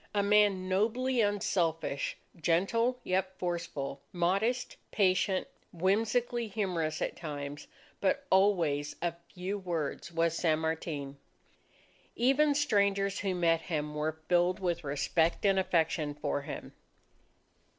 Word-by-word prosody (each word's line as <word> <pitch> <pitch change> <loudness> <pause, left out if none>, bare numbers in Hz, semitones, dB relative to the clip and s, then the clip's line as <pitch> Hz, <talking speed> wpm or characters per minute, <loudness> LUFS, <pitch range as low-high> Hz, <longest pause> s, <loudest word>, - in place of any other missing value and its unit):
A 200 - +3
man 200 -2 +3
nobly 230 +6 +1
unselfish, 170 -8 0 0.2
gentle 195 - +1
yet 185 0 -1
forceful, 170 -6 -3
modest, 200 +8 0
patient, 190 -1 +2 0.2
whimsically 225 +6 +1
humorous 180 -7 -1
at - - -3
times, 145 -3 -6 0.3
but 195 - +1
always 170 -7 +3
of 170 -1 0 0.2
few 190 +3 -4
words 170 -4 -3
was 165 0 +1
San 160 -2 +2
Martin. 160 -3 -3 1.0
Even 280 +4 +3
strangers 200 -8 +2
who 190 -2 -1
met 165 -2 +2
him 150 -4 -3
were 155 +1 -3
filled 175 +2 +3
with 175 -3 -1
respect 160 +6 0
and 195 -1 +4
affection 160 -4 +1
for 145 -1 -2
him. 140 - -7
180 Hz, 115 wpm, -31 LUFS, 160-200 Hz, 1.0 s, and